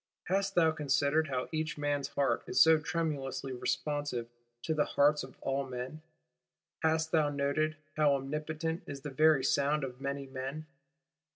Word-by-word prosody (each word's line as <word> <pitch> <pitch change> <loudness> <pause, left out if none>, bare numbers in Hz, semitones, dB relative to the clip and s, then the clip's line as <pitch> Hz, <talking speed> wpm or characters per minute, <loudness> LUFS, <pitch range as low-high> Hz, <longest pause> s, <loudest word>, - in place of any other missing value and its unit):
Hast 195 +2 0
thou 165 -2 +5
considered 150 +1 +1
how 130 -2 -2
each 155 -1 -2
man's 145 -1 -1
heart 140 -1 0
is - - +1
so 160 -1 +7
tremulously 140 -5 -2
responsive 145 -1 -2 0.4
to 160 - 0
the 150 -1 +2
hearts 145 +1 +3
of 130 -1 -10
all 135 +1 0
men; 130 +4 -6 0.8
hast 160 0 +1
thou 155 -3 +3
noted 145 +2 0 0.2
how 150 -2 +4
omnipotent 155 +4 -3
is 140 -1 -6
the 145 0 -6
very 155 0 +4
sound 145 +1 +2
of 130 0 -6
many 140 0 -3
men? 135 +3 -5
145 Hz, 155 wpm, -32 LUFS, 135-155 Hz, 0.8 s, so